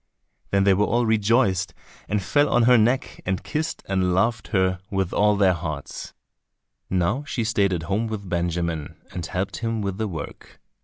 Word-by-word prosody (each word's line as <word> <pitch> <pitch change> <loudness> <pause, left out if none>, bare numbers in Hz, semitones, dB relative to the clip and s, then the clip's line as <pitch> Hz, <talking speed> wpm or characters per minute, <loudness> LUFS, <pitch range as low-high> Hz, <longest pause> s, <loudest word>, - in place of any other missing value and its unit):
Then 100 0 +2
they 100 0 +5
were 100 +2 +2
all 120 +1 +2
rejoiced, 110 -3 +2 0.3
and 105 -1 0
fell 145 +8 +2
on 120 - +3
her 125 +2 +6
neck, 120 +4 +1
and 95 0 -2
kissed 155 +1 -3
and 95 -2 +1
loved 110 +3 +1
her 95 -3 +1
with 95 -2 -1
all 105 0 +3
their 95 -2 +4
hearts. 75 -5 -6 0.7
Now 95 +9 0
she 125 -4 -2
stayed 105 -3 +2
at 85 -3 -2
home 100 +6 -1
with 105 -3 -5
Benjamin 85 -3 -2
and 90 - -5
helped 90 +3 -3
him 115 -1 -2
with 100 0 -3
the 110 - 0
work. 80 -6 -8
100 Hz, 175 wpm, -24 LUFS, 90-115 Hz, 0.7 s, her